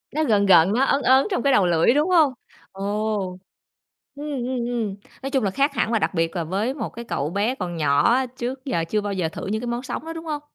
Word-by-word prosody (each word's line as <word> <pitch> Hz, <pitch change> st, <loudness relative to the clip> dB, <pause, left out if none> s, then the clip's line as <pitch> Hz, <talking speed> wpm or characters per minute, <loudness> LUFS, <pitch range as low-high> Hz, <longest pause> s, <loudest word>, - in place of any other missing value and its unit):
Nó 315 Hz, -, +2 dB
gợn 205 Hz, -6 st, +3 dB
gợn, 180 Hz, +1 st, +6 dB
nó 255 Hz, +3 st, +2 dB
ớn 275 Hz, +1 st, +2 dB
ớn 265 Hz, +5 st, +5 dB
trong 370 Hz, -, 0 dB
cái 275 Hz, -1 st, +3 dB
đầu 195 Hz, -, +4 dB
lưỡi, 170 Hz, +7 st, +3 dB
đúng 300 Hz, +5 st, +2 dB
hông? 315 Hz, -7 st, +4 dB, 0.4 s
Ồ! 200 Hz, -1 st, -2 dB, 0.8 s
Ừm, 290 Hz, -, -7 dB, 0.2 s
ừm, 250 Hz, -1 st, -2 dB
ừm, 230 Hz, -5 st, -2 dB, 0.3 s
nói 270 Hz, -, -2 dB
chung 265 Hz, -4 st, +1 dB
là 195 Hz, -, 0 dB
khác 280 Hz, +5 st, +1 dB
hẳn 235 Hz, -4 st, 0 dB
là 225 Hz, -, +3 dB
đặc -, -, -1 dB
biệt 165 Hz, 0 st, -1 dB
là 170 Hz, -, -1 dB
với 200 Hz, +10 st, -1 dB
một 285 Hz, -, -4 dB
cái 235 Hz, 0 st, -9 dB
cậu 145 Hz, -8 st, -2 dB
bé 205 Hz, +8 st, 0 dB
còn 175 Hz, -5 st, -5 dB
nhỏ 145 Hz, +7 st, +3 dB
á, 265 Hz, -, +1 dB
trước 260 Hz, +3 st, -5 dB
giờ 170 Hz, -11 st, -1 dB
chưa 210 Hz, -1 st, +1 dB
bao 205 Hz, -1 st, -3 dB
giờ 180 Hz, -4 st, -1 dB
thử -, -, -7 dB
những 215 Hz, +3 st, -2 dB
cái 245 Hz, -, -5 dB
món 240 Hz, +2 st, -3 dB
sống 265 Hz, +4 st, -5 dB
đó, 325 Hz, -, -5 dB
đúng 325 Hz, 0 st, -8 dB
hông? 300 Hz, -2 st, -3 dB
225 Hz, 260 wpm, -23 LUFS, 190-265 Hz, 0.8 s, gợn